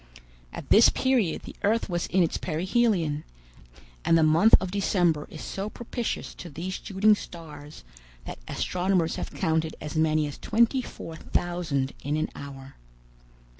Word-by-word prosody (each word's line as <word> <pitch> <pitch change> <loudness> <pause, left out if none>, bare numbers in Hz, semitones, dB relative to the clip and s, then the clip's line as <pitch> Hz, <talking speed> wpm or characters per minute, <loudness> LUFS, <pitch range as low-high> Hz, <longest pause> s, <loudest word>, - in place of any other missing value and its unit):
At - - -9
this 220 - +8
period 250 -10 +1
the - - -10
earth 225 +3 +1
was 175 -3 -2
in 185 0 +3
its 165 - -1
perihelion, 175 -3 0 0.8
and 165 - +4
the 160 - +4
month 165 +8 +6
of 185 - -4
December 175 -6 +1
is 155 - -9
so 195 +2 -4
propitious 240 +1 -4
to 175 - -9
these 175 +5 -5
shooting 205 +2 +4
stars, 155 - -8 0.4
that - - -7
astronomers 180 -2 0
have - - -4
counted 160 0 -1
as 150 0 -6
many 155 -1 +2
as 145 - -7
twenty 235 +4 +2
four 165 -8 -9
thousand 165 -8 -1
in 145 +2 -1
an 155 - -1
hour. 135 -1 -10
170 Hz, 150 wpm, -26 LUFS, 155-200 Hz, 0.8 s, this